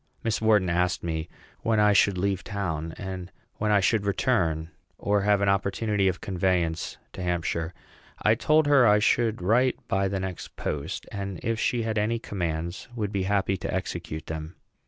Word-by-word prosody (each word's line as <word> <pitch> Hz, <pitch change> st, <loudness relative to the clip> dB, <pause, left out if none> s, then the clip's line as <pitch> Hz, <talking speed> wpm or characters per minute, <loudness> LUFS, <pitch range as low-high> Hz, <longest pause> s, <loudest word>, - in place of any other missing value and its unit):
Miss 115 Hz, -1 st, 0 dB
Wharton 105 Hz, -4 st, +4 dB
asked 90 Hz, +1 st, +1 dB
me 80 Hz, -1 st, -3 dB, 0.3 s
when 110 Hz, -1 st, +1 dB
I 105 Hz, 0 st, +5 dB
should 100 Hz, -1 st, +4 dB
leave 95 Hz, -1 st, 0 dB
town, 80 Hz, -6 st, -3 dB
and 95 Hz, -2 st, -6 dB, 0.3 s
when 105 Hz, -, 0 dB
I 105 Hz, -1 st, +4 dB
should 105 Hz, +2 st, +2 dB
return, 85 Hz, -7 st, 0 dB, 0.3 s
or 105 Hz, 0 st, +1 dB
have 100 Hz, 0 st, +3 dB
an 100 Hz, -, +2 dB
opportunity 100 Hz, +1 st, +1 dB
of 90 Hz, -1 st, 0 dB
conveyance 90 Hz, -3 st, 0 dB, 0.2 s
to -, -, -7 dB
Hampshire. 85 Hz, -2 st, -1 dB, 0.5 s
I 110 Hz, -, +4 dB
told 155 Hz, +7 st, +3 dB
her 140 Hz, -4 st, +6 dB
I 105 Hz, 0 st, +6 dB
should 110 Hz, -1 st, +2 dB
write 125 Hz, +6 st, +3 dB
by 95 Hz, 0 st, +1 dB
the 95 Hz, 0 st, -2 dB
next 95 Hz, -2 st, -6 dB
post, 75 Hz, +5 st, -4 dB
and, 100 Hz, -3 st, -4 dB
if 115 Hz, -1 st, -1 dB
she 120 Hz, 0 st, +1 dB
had 110 Hz, -1 st, 0 dB
any 110 Hz, +3 st, +1 dB
commands, 85 Hz, -5 st, -4 dB
would 105 Hz, -4 st, -2 dB
be 95 Hz, -2 st, -1 dB
happy 95 Hz, -1 st, +1 dB
to 95 Hz, +2 st, -4 dB
execute 85 Hz, -4 st, -4 dB
them. 80 Hz, +1 st, -6 dB
95 Hz, 175 wpm, -26 LUFS, 85-105 Hz, 0.5 s, her